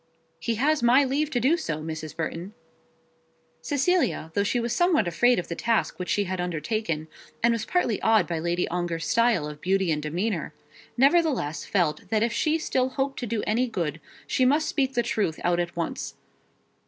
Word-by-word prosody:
"He 230 +7 -1
has 295 +6 +2
my 245 +4 +5
leave 280 +3 0
to 250 - 0
do 265 +8 +3
so, 160 - -3
Mrs. 155 -1 -6
Burton." 170 +5 -4 1.1
Cecilia, 285 - 0
though 200 - +2
she 230 +4 0
was 235 0 -1
somewhat 335 - +3
afraid 240 +9 +3
of 180 - -2
the - - -3
task 230 +4 0
which 180 - -4
she 205 - +2
had 185 -1 -3
undertaken, 165 -1 -2 0.4
and 235 - +5
was 230 -2 -2
partly 245 - 0
awed 220 -5 +4
by 170 -2 -2
Lady 175 +2 0
Ongar's 170 -2 -2
style 230 -5 +2
of 150 0 -9
beauty 190 -1 +1
and 150 -1 0
demeanour, 175 +9 -2 0.4
nevertheless 270 - +2
felt 175 -6 0
that 220 -1 +2
if 230 0 0
she 315 0 +1
still 260 -5 0
hoped 270 +1 -2
to 245 - -4
do 220 -1 -2
any 235 +4 +1
good, 165 - -3 0.2
she 260 - +1
must 295 +5 +3
speak 270 -2 0
the 240 - +2
truth 185 -10 -1
out 175 0 +2
at 175 0 -2
once. 170 -1 -4
215 Hz, 190 wpm, -26 LUFS, 170-255 Hz, 1.1 s, my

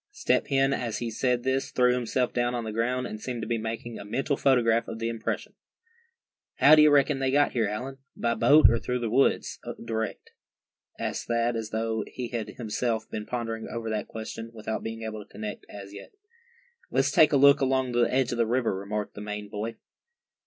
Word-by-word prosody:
Step 410 - 0
Hen 135 0 +2
as 120 -5 -2
he 120 -1 -3
said 125 +1 0
this 130 +1 0
threw 125 -1 +3
himself 125 0 -1
down 120 0 0
on 120 - -2
the 110 - -4
ground, 125 +3 -1
and 110 -3 -6
seemed 125 -2 -4
to - - -5
be 115 -1 -1
making 115 +1 -5
a - - -7
mental 135 +7 -1
photograph 115 -4 +3
of 110 - -6
the 115 +1 -2
impression. 115 -1 -4 1.0
"How 145 - +6
d'ye 150 0 +8
reckon 145 -1 +4
they 135 -1 +1
got 145 +2 +3
here, 115 -4 +1
Allan; 130 +6 -5 0.2
by 115 0 +1
boat, 150 +6 +6
or 115 0 +2
through 125 +2 -2
the 115 -3 -3
woods 135 +3 +2 0.3
direct?" 110 -1 -4 0.7
asked - - -3
Thad, 115 0 +1
as 110 -1 -3
though 110 0 -1
he 125 -2 -6
had 115 -3 -3
himself 115 -1 -2
been 105 0 -5
pondering 115 -2 -4
over 115 -1 -4
that 110 - -2
question, 115 +1 -7
without 110 0 -4
being 115 0 -6
able 110 -1 -5
to - - -27
connect, 105 0 -7
as 100 -1 -10
yet. 100 - -10 0.8
"Let's - - +1
take 155 0 +6
a 145 - +4
look 140 +1 +6
along 130 -1 +1
the 120 0 +2
edge 130 -1 +1
of 120 - -3
the 115 - +3
river," 120 -3 +1
remarked 105 +2 -4
the 105 - -8
Maine 105 0 -5
boy. 105 +3 -4
115 Hz, 205 wpm, -27 LUFS, 110-130 Hz, 1.0 s, d'ye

